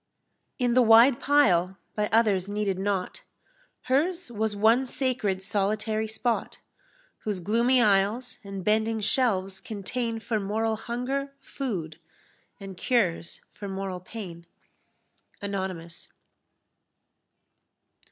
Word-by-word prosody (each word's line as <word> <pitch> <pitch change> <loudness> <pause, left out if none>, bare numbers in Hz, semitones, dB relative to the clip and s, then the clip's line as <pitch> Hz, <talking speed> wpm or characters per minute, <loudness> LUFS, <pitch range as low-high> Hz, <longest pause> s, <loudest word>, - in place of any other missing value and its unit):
In 245 -2 +1
the 255 - +5
wide 235 +2 +7
pile, 190 -11 +3 0.2
by 210 0 +1
others 210 -4 +2
heeded 205 -2 -1
not, 200 - -2 0.6
Hers 325 +5 0
was 220 -1 -1
one 225 +5 +4
sacred 235 -8 -1
solitary 215 +2 -1
spot, 230 +2 -1 0.6
Whose 210 -3 -3
gloomy 235 +7 +3
aisles 210 +5 +1
and 195 -2 -7
bending 220 +1 +2
shelves 200 -4 +1
contain 225 +2 -3
For 220 -1 -2
moral 220 +3 -1
hunger 265 +5 -3
food, 185 - -5 0.6
and 195 -1 -8
cures 180 -5 0
for 205 - -7
moral 190 -1 -4
pain. 180 -4 -9 0.9
Anonymous. 190 -4 -5
215 Hz, 105 wpm, -27 LUFS, 195-240 Hz, 0.9 s, wide